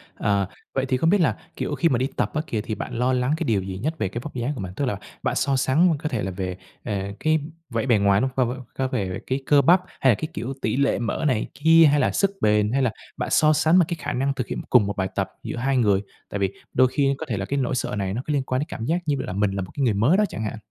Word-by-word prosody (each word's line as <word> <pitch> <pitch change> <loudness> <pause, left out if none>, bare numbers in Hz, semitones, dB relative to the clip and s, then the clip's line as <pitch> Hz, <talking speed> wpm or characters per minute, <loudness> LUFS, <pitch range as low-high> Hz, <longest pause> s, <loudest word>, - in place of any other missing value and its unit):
À, 100 -2 +1 0.3
vậy 135 0 0
thì 130 -1 0
không 165 +5 +2
biết 200 -1 +4
là, 160 - +2 0.2
kiểu, 145 - -2
khi 165 +3 +2
mà 125 - +2
đi 130 +3 0
tập - - 0
á 155 - 0
kìa, 110 -2 -2
thì 110 -1 -4
bạn - - -6
lo 125 +2 +1
lắng 125 +3 +1
cái - - -2
điều 105 -5 +1
gì 95 0 -5
nhất 155 +10 -3
về - - -1
cái 105 +6 -5
vóc 150 - -8
dáng 125 +4 -1
của 110 - -5
mình? 90 -1 -6
Tức 140 - -1
là 105 -6 -1 0.3
bạn - - 0
so 140 0 +1
sánh 155 +6 +3
có 155 - -3
thể 120 - -2
là 95 - -2
về, 90 -1 -4 0.3
à, 100 -3 -3
cái 155 0 +2 0.3
vẻ 115 -1 -1
bề 120 -4 +4
ngoài, 100 +1 +3
đúng 130 - +1
không? 130 0 0
Có 130 -1 0
về 95 -7 -2
cái 130 +1 0
cơ 145 -1 +5
bắp 175 +6 +5 0.2
hay 130 - +5
là - - +3
cái, 155 - -4
kiểu, 130 +4 -4
tỉ 110 +4 0
lệ 140 -3 +2
mỡ 120 +6 -2
này 125 -5 0
kia, 165 +2 +6
hay 145 - +3
là 130 - +2
sức 195 0 +1
bền, 105 0 +3
hay 135 - +2
là 125 - +2 0.3
bạn - - -2
so 155 0 +5
sánh 160 +4 +4
mà 175 - +5
cái 170 - -3
khả - - -3
năng 135 +2 0
thực 125 -3 -4
hiện - - -4
cùng 120 -5 +5
một 100 - -3
bài 95 -1 0
tập - - -1
giữa - - -5
hai 135 +2 +1
người? 100 -5 +3 0.3
Tại 100 - -4
vì 100 -1 0 0.2
đôi 130 - +5
khi 140 +1 +1
có 160 - -5
thể 110 - -1
là 100 - -2
cái 140 +6 -1
nỗi 130 0 0
sợ 110 - -2
này 95 -2 -2
nó 120 - -2
cứ 150 - -1
liên 140 -2 +1
quan 130 0 -1
đến 150 - -2
cảm 115 - -5
giác 170 +5 +1
như 145 -2 +1
là 130 - -4
mình 100 +1 +1
là 95 0 -2
một 90 - -7
cái 140 - -2
người 115 -5 +3
mới 125 - +3
đó 210 - +4
chẳng 110 - -5
hạn. 110 - -4
130 Hz, 315 wpm, -24 LUFS, 105-145 Hz, 0.3 s, kia